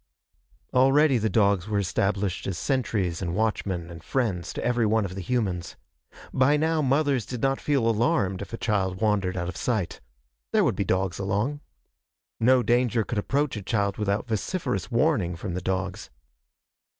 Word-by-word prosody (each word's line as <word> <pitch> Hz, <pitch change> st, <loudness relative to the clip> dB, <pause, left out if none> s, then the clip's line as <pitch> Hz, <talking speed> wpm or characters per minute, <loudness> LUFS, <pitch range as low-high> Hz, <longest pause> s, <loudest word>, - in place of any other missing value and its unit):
Already 135 Hz, +1 st, +4 dB
the 110 Hz, 0 st, 0 dB
dogs 100 Hz, -3 st, +2 dB
were 105 Hz, -1 st, 0 dB
established 100 Hz, 0 st, -1 dB
as 95 Hz, -3 st, -2 dB
sentries 105 Hz, -, -1 dB
and 85 Hz, -2 st, -2 dB
watchmen 95 Hz, -6 st, -1 dB
and 85 Hz, -1 st, -10 dB
friends 105 Hz, -10 st, -1 dB
to -, -, -4 dB
every 120 Hz, -1 st, +2 dB
one 110 Hz, -1 st, +2 dB
of 95 Hz, -, -5 dB
the 95 Hz, -, -5 dB
humans. 95 Hz, -4 st, -2 dB, 0.6 s
By 135 Hz, +3 st, +4 dB
now 160 Hz, +1 st, +1 dB
mothers 140 Hz, -2 st, +2 dB
did 125 Hz, +3 st, -6 dB
not 135 Hz, 0 st, +1 dB
feel 140 Hz, -6 st, +1 dB
alarmed 105 Hz, -4 st, +1 dB
if -, -, -7 dB
a 115 Hz, -, -4 dB
child 95 Hz, -5 st, -1 dB
wandered 100 Hz, -4 st, +1 dB
out 85 Hz, 0 st, -2 dB
of 90 Hz, -, -5 dB
sight. 110 Hz, -7 st, -2 dB, 0.5 s
There -, -, +4 dB
would -, -, +1 dB
be -, -, 0 dB
dogs 95 Hz, 0 st, 0 dB
along. 105 Hz, +9 st, -1 dB, 0.8 s
No 125 Hz, +2 st, +4 dB
danger 120 Hz, 0 st, +2 dB
could 115 Hz, 0 st, -2 dB
approach 140 Hz, +5 st, 0 dB
a 105 Hz, -, -4 dB
child 100 Hz, 0 st, -1 dB
without 105 Hz, +2 st, -1 dB
vociferous 110 Hz, -, -2 dB
warning 115 Hz, -, +1 dB
from 90 Hz, +2 st, -5 dB
the 90 Hz, -, -3 dB
dogs. 95 Hz, +2 st, -3 dB
105 Hz, 170 wpm, -26 LUFS, 95-125 Hz, 0.8 s, Already